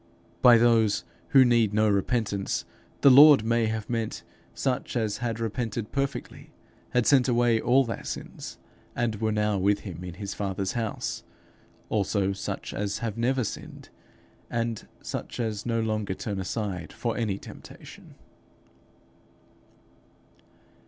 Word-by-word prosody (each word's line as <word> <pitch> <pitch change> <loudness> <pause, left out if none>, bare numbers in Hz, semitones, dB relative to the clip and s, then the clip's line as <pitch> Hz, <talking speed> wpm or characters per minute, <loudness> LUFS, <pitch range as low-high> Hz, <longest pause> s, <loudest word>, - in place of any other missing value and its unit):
By 120 -1 +8
those 115 -3 +3 0.3
'who 135 -2 +7
need 115 -4 +3
no 110 0 +4
repentance,' 100 0 0 0.4
the 140 - +8
Lord 145 -2 +9
may 115 0 +1
have 110 -1 -3
meant 115 -2 -3 0.3
such 130 -1 -2
as 110 -3 -1
had 115 -2 -3
repented 115 -1 -3
perfectly, 140 0 -4 0.4
had 125 -2 +1
sent 135 -3 +5
away 120 -2 +3
all 130 +2 +4
their 115 - -5
sins, - - -7 0.4
and 115 -3 -1
were 110 0 +1
now 105 -1 +1
with 100 +2 +2
him 90 -3 -8
in 90 -1 -7
his 100 0 -5
Father's 95 -1 -2
house; 115 -3 -3 0.7
also 100 -1 0
such 95 - -5
as 100 0 -2
have 110 -3 -3
never 125 +2 +1
sinned, - - -7 0.6
and 115 -1 -3 0.2
such - - -5
as 110 -2 -3
no 115 -1 0
longer 110 -3 -1
turn 100 -1 -4
aside 95 -4 -4
for 115 -2 -3
any 105 -5 -1
temptation. - - -13
110 Hz, 135 wpm, -27 LUFS, 100-120 Hz, 0.7 s, Lord